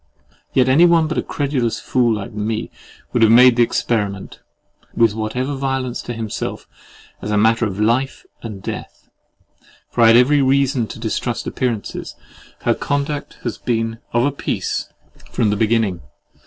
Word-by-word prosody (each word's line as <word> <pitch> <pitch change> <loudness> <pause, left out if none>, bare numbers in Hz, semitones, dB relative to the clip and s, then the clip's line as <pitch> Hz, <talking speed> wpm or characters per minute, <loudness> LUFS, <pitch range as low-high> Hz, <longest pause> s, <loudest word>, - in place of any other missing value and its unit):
Yet 130 -1 +3
any 155 +7 +6
one 170 -2 +4
but 155 - -1
a - - +1
credulous 135 -5 -1
fool 120 -3 +1
like 105 +3 -6
me 110 +1 -3 0.4
would 120 - +1
have 110 -1 +6
made 125 +1 +7
the 120 - +3
experiment, 105 -4 -1 0.6
with 115 -3 +4
whatever 120 +6 -2
violence 135 -2 -2
to 120 - -6
himself, 110 -2 -5 0.5
as - - -5
a 105 - +1
matter 110 +2 +3
of 100 0 -6
life 120 +5 0 0.2
and 105 -4 -8
death; - - -7 0.8
for 120 - 0
I 115 - +7
had 115 +1 +7
every 140 +4 +4
reason 135 -2 +2
to - - -9
distrust 115 +1 -2
appearances. 120 -5 -3 0.5
Her - - +2
conduct 145 0 -3
has 120 -4 -4
been 115 -1 -2
of 120 +2 +2
a 145 - +1
piece 140 - -3 0.4
from 105 -3 +1
the - - +1
beginning. 110 -4 +1
120 Hz, 160 wpm, -19 LUFS, 110-130 Hz, 0.8 s, made